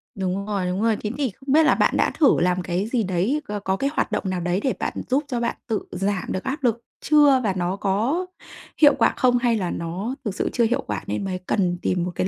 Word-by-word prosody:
Đúng 190 0 -2
rồi, 200 -3 -2
đúng 180 +2 -2
rồi. 225 -1 +2
Thế 210 - -1
thì 280 -3 0
không 265 +7 -4
biết 320 +2 +6
là - - +4
bạn - - +2
đã - - +2
thử 295 - +5
làm 180 +1 +1
cái 180 +2 -2
gì 235 -1 0
đấy, 190 - 0
có 210 0 -4
có 190 -1 -1
cái 275 +8 -1
hoạt - - -1
động - - -1
nào 185 -1 -2
đấy 175 +2 0
để 265 - +1
bạn - - -2 0.2
giúp 270 +4 +2
cho 250 -4 -2
bạn 235 0 -1
tự 220 -3 -2
giảm 195 0 -1
được 185 - -3
áp 275 +1 -4
lực 235 -2 +1 0.2
chưa 290 -3 +5
và 200 -4 +1
nó 180 +1 -1
có 220 - 0 0.6
hiệu 290 -2 +7
quả - - +4
không? 250 -1 +3
Hay 240 -1 +2
là 185 -5 -2
nó 185 +9 -4
thực 205 -3 -2
sự - - -1
chưa 240 - +2
hiệu 230 +2 +1
quả 105 -2 -3
nên 105 - -2
mới 185 -1 -3
cần 180 -1 0
tìm 180 -1 0
một 180 - -3
cái - - 0
205 Hz, 265 wpm, -23 LUFS, 185-250 Hz, 0.6 s, hiệu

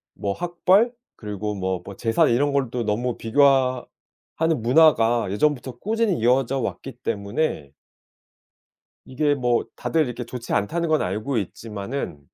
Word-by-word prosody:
뭐 100 -1 -2
학벌 180 - +2 0.3
그리고 105 -1 -4
뭐 95 -2 -2
뭐 100 - -8
재산 115 +1 +2
이런 140 +5 +2
걸 140 -3 +1
또 125 -1 -2
너무 115 +3 -1
비교하 130 +1 +3 0.5
하는 160 -5 0
문화가 120 -4 +4
예전부터 130 +2 0
꾸준히 220 - 0
이어져 130 +3 +2
왔기 135 +1 -4
때문에 100 - -2 1.4
이게 145 +3 +1
뭐 125 -3 +1
다들 160 -2 0
이렇게 120 0 -5
"좋지 120 0 -7
않다."는 170 +12 0
건 155 -1 +2
알고 105 +9 -2
있지만은 100 - -5
125 Hz, 285 characters per minute, -23 LUFS, 105-145 Hz, 1.4 s, 문화가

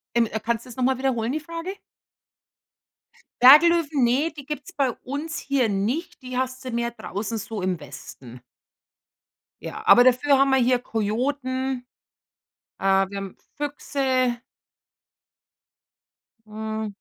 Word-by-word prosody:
Ähm, 235 -1 +3
äh, 220 +1 -4
kannst 230 +1 -2
du - - -13
das 240 - -10
noch 255 - -1
mal 260 0 +2
wiederholen, 250 -3 -1
die 310 - -1
Frage? 335 +4 -6 1.7
Berglöwen, 300 +1 +6
ne, 275 +7 +2
die 285 -2 -10
gibt's 295 -2 -6
bei 270 -3 +1
uns 290 +5 -4
hier 270 -5 0
nicht. 220 - -2
Die 250 0 -5
hast 260 0 -3
du 255 - -4
mehr 235 0 -1
draußen 220 0 -5
so 215 0 -5
im 185 -2 -1
Westen. 130 -3 -11 1.2
Ja, 435 - -7
aber 245 - +8
dafür 255 +2 +4
haben 275 0 +3
wir 265 - +4
hier 250 0 +3
Kojoten. 260 +4 -2 1.0
Äh, - - -10
wir 195 0 +2
haben 195 -1 -6 0.2
Füchse. 265 -4 -1 2.1
Hm. 220 0 -4
255 Hz, 135 wpm, -24 LUFS, 220-275 Hz, 2.1 s, aber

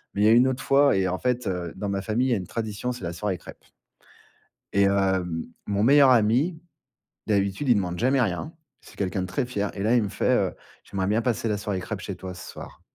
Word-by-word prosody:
mais 100 - 0
il - - +5
y - - +6
a - - +6
une 120 +3 +6
autre 130 -1 -2
fois 140 -3 +4
et 95 -1 +1
en 95 +1 -2
fait, 125 -1 -1
heu, 90 -4 -3
dans 100 +1 -4
ma 100 0 -1
famille, 115 +6 0
il - - +1
y - - +4
a - - +2
une 90 -3 -6
tradition, 110 +1 -3
c'est 125 -5 -8
la 85 0 -3
soirée 95 +2 -2
crêpes. - - -14 1.1
Et 100 - +4
hem, 95 -4 0 0.2
mon 100 0 0
meilleur 140 +2 +6
ami, 125 +8 +3 0.7
d'habitude 100 +5 0
il 120 - +6
demande 90 -3 -1
jamais 130 +5 +2
rien, 110 - -2 0.3
c'est - - -17
quelqu'un 95 -1 -1
de 90 - -3
très 95 +8 -1
fier 105 -5 -2
et 100 - -5
là, 115 +3 +3
il 120 - +3
me 100 - -3
fait, - - -1
heu: - - +1 0.3
«J'aimerais 95 -1 -3
bien 105 +3 +2
passer 115 -1 -1
la 105 -1 0
soirée 100 -2 -3
crêpes 90 - -5
chez - - -5
toi 95 -1 -7
ce 90 - -10
soir». - - -11
105 Hz, 250 wpm, -25 LUFS, 95-125 Hz, 1.1 s, y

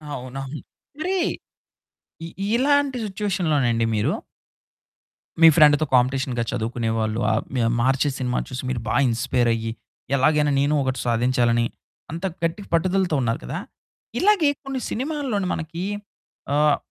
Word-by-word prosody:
అవునవును. 135 +3 -6 0.4
మరి 370 +4 0 1.1
ఇ - - -5 0.3
ఇలాంటి 280 +1 +2
సిట్యుయేషన్ 195 -3 -2
లోనండి 120 -5 +2
మీరు 105 - +1 1.3
మీ 165 - +10
ఫ్రెండ్‌తో 150 -1 +6
కాంపిటీషన్‌గా 125 -1 +1
చదువుకునేవాళ్ళు 115 -2 -1
ఆహ్, 110 - 0 0.4
'మహర్షి' 135 +3 +2
సినిమా 125 -1 0
చూసి 130 0 -5
మీరు 120 -3 -2
బాగా - - +2
ఇన్‌స్పైర్ 125 +1 +1
అయ్యి, 115 0 -3 0.4
ఎలాగైనా 150 +2 +3
నేను 145 +2 +2
ఒకటి 130 -1 -2
సాధించాలని 120 0 +2 0.5
అంత 170 +4 -4 0.2
గట్టిగా 165 +5 -2
పట్టుదలతో 180 -1 +2
ఉన్నారు 115 -1 0
కదా! - - -4 0.6
ఇలాగే 385 -7 +4
కొన్ని 270 -1 -4
సినిమాల్లోను 260 -7 -2
మనకి 165 +2 -5 0.7
ఆహ్, 150 0 +4
140 Hz, 115 wpm, -23 LUFS, 120-185 Hz, 1.3 s, మీ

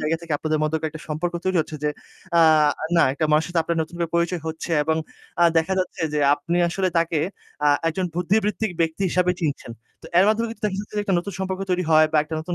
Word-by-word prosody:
জায়গা 155 +2 0
থেকে 170 -2 -6
আপনাদের 155 -1 -1
মধ্যকার 160 +1 -1
একটা 155 -1 -10
সম্পর্ক 160 +3 -2
তৈরি 185 -1 +1
হচ্ছে 155 0 -5
যে, 150 - +2 0.5
আ - - +7 0.6
না - - +6
একটা 150 +3 -1
মানুষের 155 +3 +3
সাথে 175 -2 +1
আপনার 170 0 -1
নতুন 165 - -10
করে 170 - -1
পরিচয় 170 0 0
হচ্ছে। 160 +2 -5
এবং 160 +1 +1 0.5
আ - - +7
দেখা 160 +4 0
যাচ্ছে 185 -1 -3
যে 150 - 0 0.2
আপনি 170 +4 -3
আসলে 185 +2 0
তাকে 165 -1 0 0.5
আ - - +6 0.2
একজন 185 +3 -2
বুদ্ধিবৃত্তিক 210 +4 0
ব্যক্তি 165 +3 0
হিসেবে 180 +1 +2
চিনছেন। 145 -6 -3 0.3
তো - - -10
এর 190 - +6
মাধ্যমে 225 +2 +1
কিন্তু 230 - -11
দেখা 195 -2 -3
যাচ্ছে 210 - -11
যে, 210 - +1
একটা 195 - +1
নতুন 200 +3 -5
সম্পর্ক 190 0 -3
তৈরি 180 0 +1
হয় 155 0 +6
বা 155 - +4
একটা 160 +1 -6
নতুন 175 +2 -4
170 Hz, 230 wpm, -23 LUFS, 160-185 Hz, 0.6 s, আ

